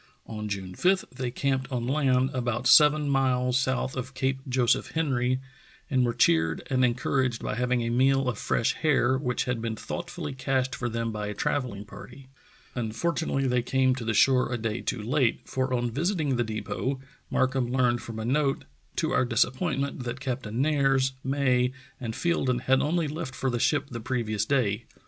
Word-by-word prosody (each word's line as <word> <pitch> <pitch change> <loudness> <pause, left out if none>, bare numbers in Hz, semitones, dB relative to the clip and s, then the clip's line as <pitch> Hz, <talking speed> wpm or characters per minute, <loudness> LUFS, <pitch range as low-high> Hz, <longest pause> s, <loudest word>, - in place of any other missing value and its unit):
On 105 -1 -5
June 95 -2 -4
5 185 - +2
they 125 -1 -2
camped 135 +1 -1
on 120 -2 -2
land, 130 -1 +2
about 120 -1 -2
seven 150 +2 +6
miles 130 -2 +1
south 130 -1 -1
of 130 +1 -5
Cape 130 +1 0
Joseph 125 -1 +1
Henry, 130 -5 +1 0.5
and 130 -2 +3
were 120 -1 +1
cheered 80 -8 +2
and 130 -1 +3
en 120 -2 +3
couraged 130 -2 0
by - - -2
having 125 +1 0
a 115 - -1
meal 135 +2 +3
of 120 -5 -2
fresh 115 - +1
hare, 135 -4 +2
which 125 -2 -1
had 125 -3 -2
been 115 -1 -2
thoughtfully 110 - -5
cached 130 0 -1
for 120 - -3
them 115 0 -2
by 105 -1 -4
a 105 - -4
travelling 120 -5 -2
party. 135 +5 -12 0.4
Unfortunately 135 +5 -1
they 125 -1 +2
came 130 +1 +2
to 125 -2 -5
the 115 -1 -1
shore 130 +2 +4
a 120 - 0
day 115 0 -3
too 115 -4 -3
late, 125 0 +1
for 130 0 -1
on 120 -1 0
visiting 155 - 0
the 120 - +1
depot 110 +4 -3 0.3
Markham 130 -1 +1
learned 125 -2 +2
from 110 +1 -7
a 110 - -4
note 135 +2 +1 0.3
to - - 0
our - - +3
disappointment 130 +3 0
that 120 +1 -4
Captain 125 -4 -3
Nares, 135 -3 +2
May, 130 -2 +1 0.3
and 115 -3 -4
Fielden 130 -8 0
had 130 +1 +3
only 165 +1 +1
left 150 -3 -5
for 130 - -1
the 120 - -1
ship 145 +2 +1
the 120 - -4
previous 110 -3 -1
day. 115 -4 0
125 Hz, 185 wpm, -27 LUFS, 120-135 Hz, 0.5 s, seven